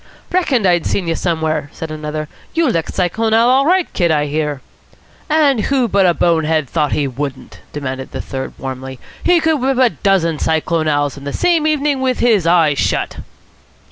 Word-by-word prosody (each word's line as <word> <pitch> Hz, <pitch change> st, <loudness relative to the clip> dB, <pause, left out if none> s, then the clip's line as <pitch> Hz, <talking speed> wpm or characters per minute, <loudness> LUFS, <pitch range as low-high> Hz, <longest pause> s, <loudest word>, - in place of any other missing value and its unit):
"Reckoned 290 Hz, -, +1 dB
I'd 175 Hz, -3 st, +2 dB
seen 185 Hz, -4 st, -1 dB
you 165 Hz, -, +1 dB
somewhere!" 160 Hz, -4 st, -1 dB
said 160 Hz, -1 st, -6 dB
another. 155 Hz, 0 st, -4 dB, 0.3 s
"You 330 Hz, -1 st, +2 dB
licked 165 Hz, -8 st, -2 dB
Cyclone 220 Hz, +5 st, +1 dB
Al. 230 Hz, +1 st, +4 dB
all 270 Hz, +2 st, +3 dB
right, 365 Hz, 0 st, +3 dB
Kid, 175 Hz, -3 st, +1 dB
I 150 Hz, -2 st, +2 dB
hear." 150 Hz, -1 st, -2 dB, 0.7 s
"And 290 Hz, -7 st, +3 dB
who 265 Hz, -3 st, +1 dB
but 195 Hz, -3 st, +3 dB
a 175 Hz, -, +2 dB
bone 165 Hz, -2 st, +2 dB
head 155 Hz, -2 st, 0 dB
thought 150 Hz, 0 st, 0 dB
he 145 Hz, -, 0 dB
wouldn't?" 135 Hz, +1 st, -6 dB
demanded 130 Hz, -2 st, -5 dB
the -, -, -6 dB
third 130 Hz, 0 st, -5 dB
warmly. 130 Hz, 0 st, -6 dB, 0.3 s
"He 355 Hz, -1 st, +4 dB
could 320 Hz, -3 st, +1 dB
whip 265 Hz, 0 st, +1 dB
a 255 Hz, -3 st, +4 dB
dozen 170 Hz, -6 st, +1 dB
Cyclone 160 Hz, 0 st, 0 dB
Al.'s 145 Hz, -1 st, 0 dB
in 140 Hz, -, -10 dB
the 140 Hz, -, -4 dB
same 330 Hz, -, +1 dB
evening 295 Hz, -3 st, 0 dB
with 255 Hz, -1 st, 0 dB
his 215 Hz, -8 st, +2 dB
eyes 165 Hz, -4 st, +3 dB
shut." -, -, -1 dB
170 Hz, 190 wpm, -17 LUFS, -, 0.7 s, Al